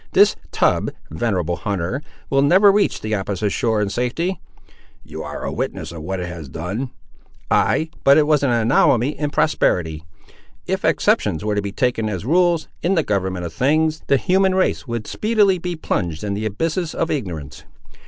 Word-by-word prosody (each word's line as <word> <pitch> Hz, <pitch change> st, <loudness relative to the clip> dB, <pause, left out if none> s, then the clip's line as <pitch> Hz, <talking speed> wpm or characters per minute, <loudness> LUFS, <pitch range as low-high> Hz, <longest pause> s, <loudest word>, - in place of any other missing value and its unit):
This -, -, +5 dB, 0.2 s
tub, -, -, +2 dB, 0.2 s
venerable 90 Hz, -1 st, -1 dB
hunter, 100 Hz, -, -2 dB, 0.3 s
will 135 Hz, 0 st, +4 dB
never 190 Hz, +8 st, +6 dB
reach 205 Hz, 0 st, +1 dB
the 110 Hz, 0 st, -3 dB
opposite 100 Hz, 0 st, -1 dB
shore 110 Hz, -1 st, +1 dB
in 100 Hz, -, -2 dB
safety." 165 Hz, -, -2 dB, 0.6 s
"You -, -, -8 dB
are -, -, -6 dB
a -, -, -2 dB
witness -, -, -4 dB
of 85 Hz, -2 st, -8 dB
what 95 Hz, +4 st, -4 dB
it 90 Hz, -, -3 dB
has 85 Hz, -5 st, -8 dB
done." 95 Hz, -, -4 dB, 0.6 s
"Ay; 160 Hz, 0 st, +2 dB
but 140 Hz, -, +6 dB
it 155 Hz, -, +5 dB
was 150 Hz, -1 st, +3 dB
an 140 Hz, -, +2 dB
anomaly 120 Hz, +1 st, +3 dB
in 150 Hz, -1 st, 0 dB
prosperity. 80 Hz, -, +1 dB, 0.6 s
If -, -, -2 dB
exceptions 80 Hz, +6 st, +1 dB
were 105 Hz, -, 0 dB
to 105 Hz, -, 0 dB
be 100 Hz, 0 st, -4 dB
taken 120 Hz, -2 st, 0 dB
as 95 Hz, -1 st, -4 dB
rules, 170 Hz, +2 st, +2 dB
in 185 Hz, +3 st, +1 dB
the 165 Hz, -, +2 dB
government 95 Hz, -4 st, -1 dB
of 85 Hz, -, -6 dB
things, 155 Hz, -, +1 dB
the 140 Hz, -, +4 dB
human 190 Hz, +5 st, +2 dB
race 185 Hz, -6 st, 0 dB
would 115 Hz, -2 st, -3 dB
speedily 210 Hz, -4 st, +2 dB
be 175 Hz, 0 st, -3 dB
plunged 85 Hz, -, -2 dB
in 100 Hz, -1 st, -2 dB
the 105 Hz, +2 st, -2 dB
abysses 165 Hz, -, -2 dB
of 165 Hz, -, -1 dB
ignorance. 80 Hz, -, -5 dB
120 Hz, 180 wpm, -20 LUFS, 95-160 Hz, 0.6 s, never